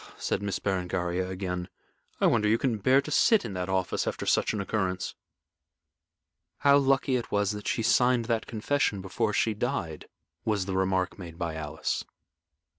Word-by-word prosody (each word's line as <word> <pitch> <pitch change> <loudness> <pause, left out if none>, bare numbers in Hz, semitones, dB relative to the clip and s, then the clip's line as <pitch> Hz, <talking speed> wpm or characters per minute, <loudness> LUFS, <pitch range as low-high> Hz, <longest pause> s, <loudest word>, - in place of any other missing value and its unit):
said - - -1
Miss 100 -2 -2
Berengaria, 90 -1 -1
again. 90 -1 -4 0.5
"I - - +3
wonder 105 0 +3
you 110 - +4
can 115 -3 -1
bear 130 +7 +4
to 150 - -7
sit 220 +7 +4
in - - -5
that 90 0 -3
office 95 -1 0
after - - -3
such - - +2
an 105 - -3
occurrence." 95 -2 -2 1.5
"How 140 0 +6
lucky 135 -1 +2
it 120 - -6
was 100 0 +1
that 105 -1 -6
she 115 - 0
signed 125 +1 +3
that 115 -1 -1
confession 110 -2 0
before 95 +2 -1
she 110 +1 +1
died," 105 - -3 0.4
was 105 -4 0
the 95 -1 -3
remark 95 0 0
made 85 -3 -9
by 85 -2 -3
Alice. 75 -2 -3
100 Hz, 170 wpm, -28 LUFS, 95-115 Hz, 1.5 s, How